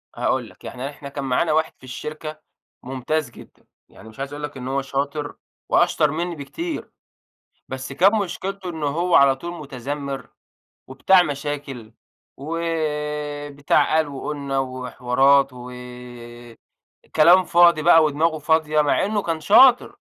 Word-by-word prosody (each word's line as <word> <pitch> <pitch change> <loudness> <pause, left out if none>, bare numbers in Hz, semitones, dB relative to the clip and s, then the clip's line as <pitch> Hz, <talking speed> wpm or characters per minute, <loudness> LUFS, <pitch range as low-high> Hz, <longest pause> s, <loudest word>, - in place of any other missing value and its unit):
هاقول - - -1
لك، - - -21
يعني 130 +3 -6
إحنا 140 -1 -10
كان 140 0 -6
معانا 135 +5 +1
واحد 160 +1 +1
في - - -28
الشركة 155 +4 -7 0.4
ممتاز 135 +2 -2
جدًا، - - -17 0.2
يعني 110 - -14
مش 110 - -17
عايز 135 +1 -5
اقول 150 +1 -7
لك 145 -2 -6
إن 125 0 -7
هو 135 +1 -1
شاطر 140 +2 -3 0.3
وأشطر 150 - +3
منّي 170 +2 -3
بكتير، 325 - -6 0.8
بس 130 +1 -6
كان 190 +8 +4
مشكلته 195 -1 -4
إن 160 -2 -7
هو 170 +5 0
على 140 -1 +6
طول 170 +6 -7
مُتذمّر 140 0 -6 0.6
وبتاع 175 +8 +4
مشاكل، 140 -6 -5 0.4
وبتاع 150 -2 -1
قال 160 -2 +2
وقُلنا 140 -1 -4
وحوارات 130 +1 +2
و 125 0 -10 1.4
كلام 175 +4 +6
فاضي 170 -3 +4
بقى 165 0 +6
ودماغه 155 +2 +1
فاضية، 155 0 +2
مع 145 - +1
إنه 205 0 -1
كان 165 -3 -3
شاطر، 245 - +5
150 Hz, 135 wpm, -22 LUFS, 135-160 Hz, 1.4 s, على